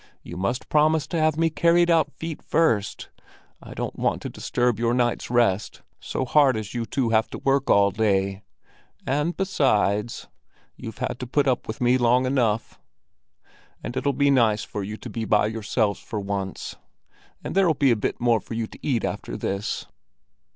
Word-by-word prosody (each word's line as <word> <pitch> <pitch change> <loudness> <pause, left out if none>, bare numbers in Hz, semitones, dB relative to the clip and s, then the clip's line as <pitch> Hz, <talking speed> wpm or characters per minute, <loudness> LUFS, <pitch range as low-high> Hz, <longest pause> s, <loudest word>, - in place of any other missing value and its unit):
You 85 - -9
must 100 +8 -2
promise 155 0 +3
to 165 +1 -3
have 155 -1 +2
me 165 0 +2
carried 170 +2 +3
out 155 -3 +3
feet 160 0 -7
first! 130 -11 0 0.5
I - - -11
don't - - -5
want - - 0
to - - -4
disturb 120 -3 -1
your 120 +1 +1
night's 120 -1 0
rest, 115 -4 +1 0.2
so - - -3
hard 135 -2 +4
as 110 -1 -6
you 120 -2 -3
two 130 -3 0
have 110 0 +2
to - - -6
work 135 0 0
all 100 0 +5
day. 100 -1 0 0.6
And, 150 +6 -1
besides, 120 - 0 0.5
you've - - -8
had - - -3
to 125 - -5
put 140 +3 +1
up 125 -2 0
with 110 - -6
me 125 +1 +3
long 125 +1 +3
enough, 120 -4 0 1.0
and 120 - -5
it'll 135 +2 +1
be 140 +1 +2
nice 110 -5 +3
for 105 - -5
you 105 +2 -5
to - - -9
be 115 - -3
by 105 -1 +3
yourselves 110 -1 -1
for 110 -5 -5
once; 100 -1 -4 0.7
and - - -5
there'll 185 -5 +3
be 135 -2 +3
a - - +4
bit 105 - -3
more 120 -2 +3
for 110 - -8
you 115 0 -1
to - - -14
eat 125 -6 0
after - - -4
this." 100 +1 -3
120 Hz, 185 wpm, -24 LUFS, 105-140 Hz, 1.0 s, all